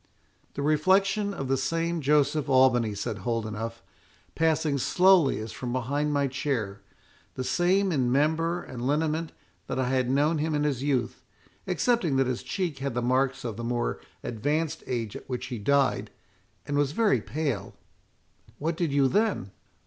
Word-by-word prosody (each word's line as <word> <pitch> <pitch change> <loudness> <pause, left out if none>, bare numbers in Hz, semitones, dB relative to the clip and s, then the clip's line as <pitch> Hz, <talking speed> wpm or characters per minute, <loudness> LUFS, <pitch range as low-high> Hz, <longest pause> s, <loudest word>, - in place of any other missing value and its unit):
"The 140 - -2
reflection 190 +7 +2
of 135 -9 -4
the 135 +1 +1
same 165 +5 -1
Joseph 145 +1 +2
Albany," 125 -5 +4
said 100 0 -4
Holdenough, 115 +1 -3 0.6
"passing 155 -3 +1
slowly 180 0 +4
as 110 0 -5
from 120 +2 -5
behind 140 +4 -1
my 145 -1 +2
chair—the 130 -3 -5
same 185 +6 +2
in 130 -6 +1
member 160 +5 +1
and 125 -2 -8
lineament 155 +2 0 0.4
that - - -3
I 130 -1 0
had 130 -1 +1
known 150 +4 +2
him 155 0 0
in 145 - +1
his 140 -4 0
youth, 125 -4 -1 0.5
excepting 185 - +1
that 135 0 +3
his 125 -1 -2
cheek 180 -8 -3
had 135 -3 -3
the 120 - 0
marks 130 +1 +1
of 115 -3 -4
the 115 - -5
more 120 0 -2 0.2
advanced 150 +7 -2
age 115 -4 -3
at - - -10
which 125 -1 -3
he 120 - -4
died, 140 +5 +2 0.6
and 145 - -2
was 145 0 +1
very 220 +2 +2
pale." 140 -10 -3 0.8
"What 160 +3 -1
did 170 -3 -1
you 140 -1 +3
then?" 200 - 0
140 Hz, 160 wpm, -27 LUFS, 125-160 Hz, 0.8 s, Albany